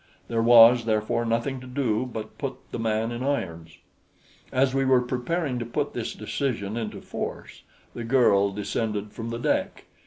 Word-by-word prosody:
There 115 -1 +1
was, 115 0 +7
therefore, 110 +1 0
nothing 120 +4 -1
to 130 - -10
do 125 -2 -1
but 110 +2 -7
put 135 -3 -3 0.2
the - - -4
man 110 0 0
in 120 +1 -5
irons. 85 - -3 0.7
As 130 0 +2
we 135 0 +2
were 130 -1 +4
preparing 125 +3 -2
to - - -2
put 120 - -2
this - - -4
decision 110 -7 -3
into 115 -3 -4
force, - - -6 0.3
the 120 - -6
girl 115 -5 +4
descended 105 +1 -3
from 115 -1 -6
the 115 - -3
deck. 120 - -1
115 Hz, 165 wpm, -26 LUFS, 110-130 Hz, 0.7 s, was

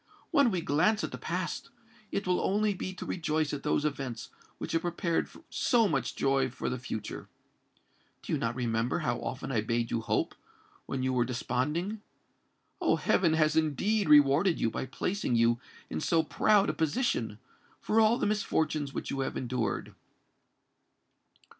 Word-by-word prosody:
When 280 -4 +5
we 185 -5 -1
glance 180 +9 +2
at - - -3
the - - -7
past, - - -3 0.4
it 200 - -2
will 180 -1 +1
only 210 +1 +2
be 185 0 -4
to 185 - -7
rejoice 155 -3 -1
at 145 - -3
those 150 0 +1
events 135 -5 -3 0.3
which - - -5
have 165 - +1
prepared 170 -1 -1 0.2
so 235 -4 +3
much 135 - -1
joy 135 -1 +2
for 125 - -4
the 125 - -3
future. 115 -3 -6 0.9
Do - - -3
you - - +1
not 115 +1 -1
remember 120 +1 0
how 120 -2 0
often 130 +1 -4
I 115 -4 +1
bade 115 +1 -1
you 115 - 0
hope, - - 0 0.5
when 130 -1 -2
you 130 0 +1
were 125 -1 +3
desponding? 145 - -2 0.8
Oh! - - +3
heaven 170 -4 +2
has 155 -1 +3
indeed 160 +6 +1
rewarded 150 +5 +5
you, 115 - +1
by 130 - -4
placing 180 - -1
you 115 0 +3 0.3
in 80 - -4
so 165 -1 +2
proud 205 +5 +3
a - - -10
position, 155 - 0 0.4
for 225 +1 +2
all 220 +2 +4
the - - 0
misfortunes 155 -8 0
which - - -3
you 140 - -3
have 135 - -2
endured." 120 -4 -2
150 Hz, 165 wpm, -30 LUFS, 125-185 Hz, 0.9 s, When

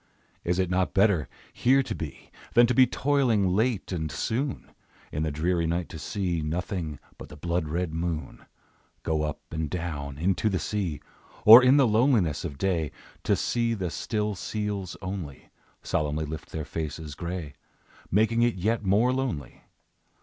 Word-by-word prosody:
Is 90 +1 0
it 95 -1 0
not 90 0 0
better 95 - +3 0.2
here 135 +2 +3
to - - -4
be, 75 -4 -8 0.2
Than 120 - +8
to 125 - +1
be 130 0 +6
toiling 125 -8 +2
late 110 +2 0
and 80 -4 -2
soon? 125 - -2 0.4
In 75 - -2
the 80 - 0
dreary 85 +3 0
night 85 +1 -1
to 80 - -8
see 90 +1 -2
Nothing 80 0 -3 0.2
but - - -9
the - - -10
blood 85 +1 -1
red 85 +1 -2
moon 80 -1 -4 0.6
Go 80 -1 0
up 75 -1 -3
and 80 -1 -2
down 75 -5 -4
into 95 +6 +1
the 95 - 0
sea; 95 -7 -2 0.4
Or, 115 +4 +12
in 130 +2 +5
the 140 - +6
loneliness 110 - +2
of 70 - -5
day, 85 -3 0 0.3
To - - +3
see 115 -1 0
the 90 -5 -3
still 105 -1 -2
seals 100 -1 -4
only 95 -8 -6 0.3
Solemnly 75 +1 -1
lift 80 +1 -7
their 80 -2 -4
faces 80 -1 -5
gray, 85 -2 -5 0.6
Making 110 +4 +2
it 120 0 +3
yet 110 +5 0
more 105 +6 +3
lonely? 125 - -4
90 Hz, 165 wpm, -27 LUFS, 80-110 Hz, 0.6 s, Or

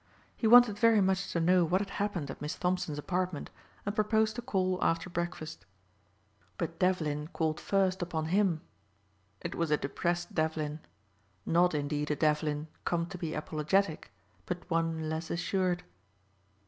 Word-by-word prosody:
He 225 - 0
wanted 235 -3 +7
very 230 -1 +5
much 190 0 +1
to 170 - 0
know 180 +2 +4
what 180 +3 +2
had 200 -1 -4
happened 175 -9 -2
at - - -10
Miss 150 +1 -3
Thompson's 180 -4 -1
apartment 180 +2 -2 0.3
and 205 - -1
proposed 215 0 +2
to 240 - -4
call 185 -6 0
after 165 +2 0
breakfast. 165 - -4 0.9
But 165 - -4
Devlin 155 -5 +1
called 160 -2 -1
first 190 -2 +1
upon 160 -2 -2
him. 190 -6 +3 0.8
It - - -4
was 170 -2 -1
a 150 - +3
depressed 175 +5 -2
Devlin. 155 -1 -1 0.7
Not 175 0 +3
indeed 145 0 -1
a 150 - +1
Devlin 150 0 +1 0.2
come 170 -1 0
to 185 - -6
be 160 -2 -3
apologetic, 155 - 0 0.4
but 180 -1 -4
one 165 -1 0
less 160 +1 -3
assured. 180 +1 0
175 Hz, 150 wpm, -31 LUFS, 155-190 Hz, 0.9 s, wanted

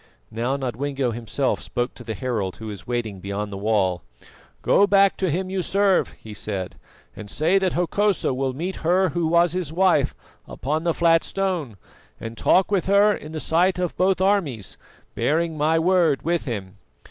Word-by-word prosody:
Now 120 +5 -1
Nodwengo 135 0 -2
himself 120 +4 -2
spoke 120 0 -3
to 120 - -12
the 110 -2 -5
herald 105 -5 -2
who 110 - -10
was 100 -4 -8
waiting 115 -5 -3
beyond 100 +2 -4
the - - -4
wall. 100 -4 +1 0.6
"Go 200 - +4
back 200 -1 +4
to 190 - 0
him 185 +4 -2
you 190 -1 -1
serve," 195 +1 +1
he 110 - -10
said, 100 -3 -4 0.4
"and 105 -2 -9
say 170 - +2
that 190 -2 0
Hokosa 190 -1 +1
will 130 +1 -1
meet 175 +8 -4
her 180 +3 +2
who 165 +1 -1
was 170 +1 +3
his 180 -5 -3
wife 175 -5 +2 0.3
upon 155 +7 -3
the 170 - +1
flat 165 -1 +4
stone 180 - -2 0.4
and 115 0 -7
talk 190 - +3
with 190 -4 +1
her 200 +2 +5
in 155 - -8
the 160 - -4
sight 180 +4 +2
of 180 -2 -2
both 185 0 +2
armies, 170 - 0 0.4
bearing 165 +1 0
my 155 +2 +2
word 170 -4 +2
with 170 +1 0
him. 100 -6 -5
155 Hz, 180 wpm, -23 LUFS, 115-185 Hz, 0.6 s, her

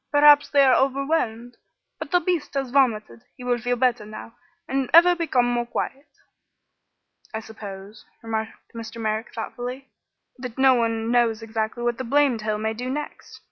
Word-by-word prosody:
Perhaps 290 0 +6
they 280 -1 +5
are 260 - +5
overwhelmed. 265 -4 0 0.4
But 315 - -6
the 355 - +3
beast 350 -6 -2
has 270 -3 -2
vomited; 215 - +1 0.2
he 250 - -10
will 245 -1 0
feel 245 +1 -1
better 245 -2 +1
now, 215 +2 -10 0.3
and 270 -1 -1
ever 350 +1 +8
become 290 -8 +1
more 240 0 -1
quiet." 275 +4 -4 1.3
"I - - -1
suppose," 205 -2 -10 0.2
remarked 220 -1 -5
Mr. 230 0 -8
Merrick, 220 +1 -2
thoughtfully, 250 +3 -6 0.5
"that 250 -2 -7
no 265 0 +6
one 230 -1 0
knows 235 -2 +2
exactly 225 +1 -3
what 240 0 -1
the - - -2
blamed 265 -2 +2
hill 215 0 -1
may 220 +1 -2
do 250 +3 -5
next. 295 +3 -6
245 Hz, 165 wpm, -24 LUFS, 225-270 Hz, 1.3 s, ever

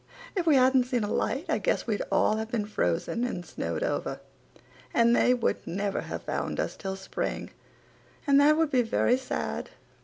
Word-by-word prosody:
If 355 -3 -1
we 305 - +6
hadn't 260 -1 +5
seen 245 -3 -1
a 205 - -2
light 265 +10 -1
I - - +1
guess - - 0
we'd 215 -3 -1
all 215 - +3
have 220 0 -4
been 225 -3 -1
frozen 210 - -1
and 180 -8 -3
snowed - - -3
over, - - -2 0.8
and 235 0 +5
they 250 - +4
would 240 - -1
never 200 +2 -2
have - - -6
found - - -3
us - - -2
till 190 -1 -4
spring 190 - -4 0.7
and 280 -1 +5
that 305 +2 +5
would 320 -2 +2
be 255 - +4
very 240 +1 +2
sad. 260 0 -4
245 Hz, 185 wpm, -28 LUFS, 210-265 Hz, 0.8 s, we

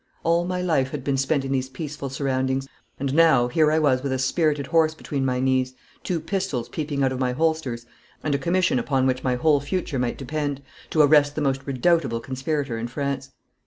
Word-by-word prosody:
All 170 +1 +2
my 180 0 -2
life 140 -7 +1
had 140 -2 -5
been 140 0 0
spent 135 +1 0
in 135 - -3
these 130 -1 -1
peaceful 145 0 -6
surroundings, 130 0 -1 0.3
and 135 0 -1
now, 155 -6 +5
here 155 +4 +3
I 155 - +3
was 140 -5 +3
with 140 0 -2
a 130 - 0
spirited 145 +2 +1
horse 160 +1 +2
between 140 -3 -3
my 130 -1 0
knees, 130 0 +1 0.3
two 175 -2 -1
pistols 165 - -2
peeping 145 -3 -2
out 130 - +2
of 130 - -3
my 125 -1 0
holsters, 150 -6 -1 0.4
and 150 - 0
a 140 - +1
commission 170 -1 +2
upon 130 +1 +1
which 130 0 0
my 125 -1 +1
whole 145 +3 +3
future 145 -2 -2
might 125 -1 -1
depend, 145 0 -3 0.3
to 155 - +4
arrest 145 0 +5
the 155 - -2
most 135 -2 0
redoubtable 135 -2 +1
conspirator 130 0 -3
in 115 - -3
France. 140 +1 -3
140 Hz, 205 wpm, -24 LUFS, 130-155 Hz, 0.4 s, now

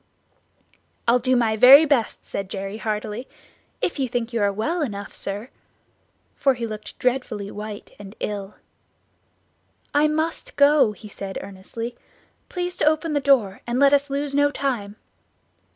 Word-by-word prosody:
"I'll 240 +2 +5
do 255 +1 +2
my 230 -3 +2
very 265 +7 +9
best," 275 -7 0
said 195 -1 -5
Jerry 195 +2 -5
heartily, 215 +2 -4 0.5
"if 340 - -1
you 265 - +1
think 240 0 -3
you 230 - 0
are 200 0 +3
well 300 - -1
enough, 205 -8 -4
sir," 205 +5 -5 0.8
for 270 -2 +2
he 240 -1 -3
looked 215 -1 -7
dreadfully 245 -5 -1
white 210 0 -7
and 200 +1 -10
ill. 200 -1 -4 1.4
"I 295 +1 +4
must 315 +2 -2
go," 285 -5 +5
he 210 - -12
said 195 -1 -7
earnestly, 215 +5 -7 0.5
"please 360 0 -3
to - - +1
open 310 +1 +2
the 290 - +2
door, 255 -9 +2
and 240 +1 0
let 280 0 +6
us 285 0 +3
lose 280 +1 -2
no 285 +1 +4
time." 245 -8 -3
240 Hz, 150 wpm, -23 LUFS, 210-280 Hz, 1.4 s, very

